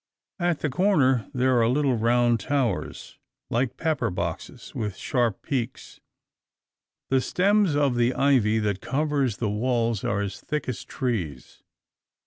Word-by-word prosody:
At 175 -3 0
the 150 - 0
corner 140 - +2
there 130 -2 +2
are 115 - +3
little 135 0 +2
round 120 +1 +2
towers, 130 -5 -2 0.3
like 120 +1 0
pepperboxes, 115 - -3
with 105 -4 -4
sharp 120 -5 -1
peaks. 130 -2 -4 1.1
The 135 -1 +4
stems 195 +1 +2
of 145 -3 +2
the 120 +1 +1
ivy 125 -6 +3
that 105 -3 -1
covers 140 -4 0
the 115 - -1
walls 115 -1 0
are 100 0 0
as 100 -1 -5
thick 150 -2 -3
as 125 - -4
trees. 90 - -4
125 Hz, 130 wpm, -25 LUFS, 110-140 Hz, 1.1 s, The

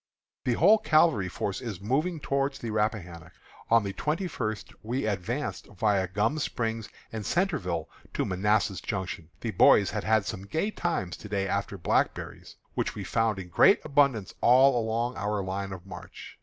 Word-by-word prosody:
The 125 - +2
whole 200 - +5
cavalry 155 - +3
force 100 +2 -3
is 110 -8 -5
moving 150 - 0
towards 140 -1 -1
the 115 - -5
Rappahannock. 105 -7 -2 0.4
On 115 -1 +5
the 100 -1 -3
twenty 155 - -1
first 110 -9 -4
we 120 +3 -2
advanced 110 +7 -3
viâ 100 -2 0
Gum 110 +10 +1
Spring 115 -5 -2 0.3
and 110 -2 -4
Centreville 140 - -1 0.3
to - - 0
Manassas 100 +1 +1
Junction. 90 -4 -4
The 115 - -2
boys 100 -1 +5
have 105 0 -3
had 110 -2 +2
some 95 +1 -5
gay 160 - -1
times 165 - -2
to 105 - -10
day 100 -1 -1
after 100 +1 -2
blackberries, 85 - -1 0.2
which - - -2
we - - -5
found 115 -2 0
in 90 -2 -7
great 195 - +6
abundance 140 -8 +2
all 130 +2 +6
along 115 +3 -1
our 105 0 -1
line 95 +1 -3
of 95 -1 -8
march. 95 - -10
110 Hz, 170 wpm, -28 LUFS, 95-135 Hz, 0.4 s, great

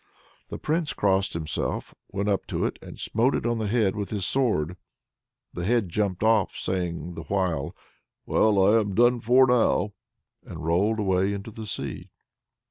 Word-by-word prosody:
The - - -5
Prince 155 0 -1
crossed 95 0 +1
himself, 80 -2 -3 0.2
went 100 +1 -2
up 100 -2 0
to - - -1
it - - -3
and - - -11
smote 120 +5 +1
it - - -2
on 120 -1 0
the 110 - -1
head 105 -3 +1
with 100 -2 -3
his 100 -4 -2
sword. 90 - 0 0.8
The 85 - -4
head 110 -1 +1
jumped 100 +1 -1
off, 110 -3 +3
saying 90 -2 -3
the 85 - -7
while, 90 -5 -1 0.5
"Well, 100 -3 +3
I'm 100 -3 -2
done 120 +1 +4
for 125 +4 +5
now!" 120 -4 +2 0.5
and 80 -1 -8
rolled 100 +7 +2
far 105 - -1
away 95 +1 +2
into 100 +2 -6
the 110 0 -8
sea. - - -5
100 Hz, 170 wpm, -26 LUFS, 90-115 Hz, 0.8 s, for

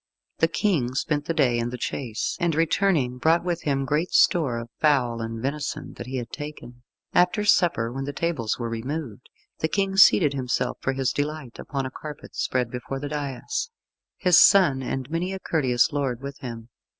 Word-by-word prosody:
The 165 - +4
King 160 - 0
spent 145 +1 -1
the 165 - -1
day 125 -6 +3
in 120 0 -1
the 125 - -5
chase, 120 -2 -3
and 170 -2 +1
returning, 160 -6 +1
brought 165 +5 +3
with 175 -1 -2
him 135 -2 0
great 150 +6 0
store 145 -9 +4
of 115 0 -7
fowl 125 -6 +2
and 115 0 -4
venison 140 +4 -4
that 120 - -8
he 130 - -5
had 120 -2 -5
taken. 145 -5 -8 0.3
After 180 +4 +3
supper, 140 - +3
when 135 +1 -4
the 145 - -3
tables 145 -8 -1
were 120 - -3
removed, 125 +1 -5 0.3
the 160 - +1
King 195 +2 -1
seated 160 -6 +6
himself 125 -1 -2
for 130 - 0
his 135 -2 0
delight 145 -3 -4
upon 135 -2 -3
a 130 - -5
carpet 150 +1 -9
spread 125 -2 -1
before 125 +2 -5
the 145 +1 -5
dais, 150 - -3 0.5
his 180 -4 +5
son 150 -10 +6
and 130 0 -3
many 175 +3 -1
a 190 - -5
courteous 130 -6 +1
lord 135 -5 -1
with 140 +1 -8
him. 115 -4 -7
140 Hz, 185 wpm, -25 LUFS, 125-160 Hz, 0.5 s, seated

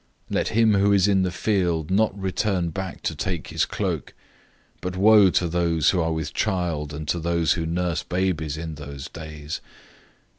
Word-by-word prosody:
013:016 - - -1
Let - - 0
him 110 -1 +3
who 100 0 +3
is 100 -1 +4
in 100 -2 +3
the 95 - +1
field 90 -5 0
not 105 0 +2
return 95 -2 0
back 95 +2 -6
to - - -1
take 85 +1 -3
his - - +1
cloak. - - -3 0.6
013:017 - - -36
But 90 0 -4
woe 105 0 +7
to 90 -1 +1
those 85 -2 +2
who 90 - +1
are 80 0 0
with 80 -2 -3
child 85 -7 -1
and 75 +1 -6
to 85 - 0
those 85 -2 +1
who 80 -1 -3
nurse 85 0 -1
babies 90 -5 -1
in 80 0 -5
those 70 -2 -8
days! 75 -1 -7
85 Hz, 190 wpm, -24 LUFS, 80-95 Hz, 0.6 s, woe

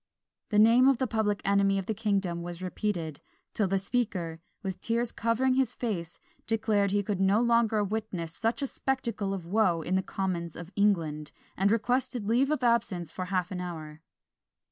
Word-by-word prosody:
The 210 - +1
name 230 +4 +6
of 270 -2 +5
the 260 - 0
public 220 -3 0
enemy 200 0 +3
of 195 - -2
the 220 - -1
kingdom 195 -5 -1
was 175 0 -6
repeated, 180 -5 -3 0.3
till 210 - +1
the 195 +1 +1
Speaker, 190 -6 -2 0.2
with 190 -2 -4
tears 235 +1 0
covering 235 +3 +1
his 265 0 +1
face, 175 -8 -3 0.3
declared 215 -3 +2
he 205 +1 +1
could 200 -1 -2
no 195 +3 +4
longer 230 -3 +3
witness 200 -6 -3
such 225 - -1
a - - +2
spectacle 235 -7 -2
of 190 -4 -4
woe 180 -3 +2
in 175 - -2
the 190 - +3
commons 180 -4 -3
of 175 +1 -9
England, 160 -7 +1 0.2
and 195 +2 +2
requested 245 0 0
leave 245 +6 +2
of 300 -4 0
absence 220 -9 +1
for 185 - -4
half 185 -1 -1
an 180 -1 -3
hour. 160 -3 -7
200 Hz, 180 wpm, -29 LUFS, 180-230 Hz, 0.3 s, name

